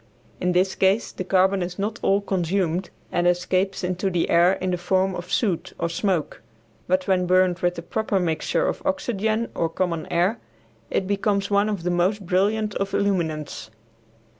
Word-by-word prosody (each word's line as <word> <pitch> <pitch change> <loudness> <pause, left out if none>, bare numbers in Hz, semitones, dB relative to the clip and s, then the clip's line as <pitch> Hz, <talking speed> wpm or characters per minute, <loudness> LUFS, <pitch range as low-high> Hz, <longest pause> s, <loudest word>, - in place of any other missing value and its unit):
In 180 0 0
this 185 +2 +2
case 195 +4 +2
the - - -5
carbon 190 +1 +2
is 180 0 -4
not 215 +3 -3
all 200 +1 +2
consumed 185 -2 -1 0.2
and 175 0 +1
escapes 185 +2 0
into 185 +2 -1
the 175 -2 0
air 175 +2 +5
in 185 -1 -2
the 180 - 0
form 185 +2 +1
of 180 0 -7
soot 195 -8 0
or 170 - -1
smoke, 170 -1 -1 0.5
but 185 +1 +1
when 185 -2 +2
burned 185 -1 +3
with 175 0 0
the 170 - -6
proper 200 +2 -1
mixture 175 - 0
of - - -2
oxygen 230 -6 -1
or 165 - 0
common 170 -1 -2
air 180 +7 +1 0.5
it 190 - 0
becomes 200 0 0
one 200 +1 +3
of 200 -5 -3
the 180 - 0
most 185 +3 +1
brilliant 205 +4 +1
of 195 0 -2
illuminants. 160 - -1
185 Hz, 175 wpm, -24 LUFS, 175-200 Hz, 0.5 s, air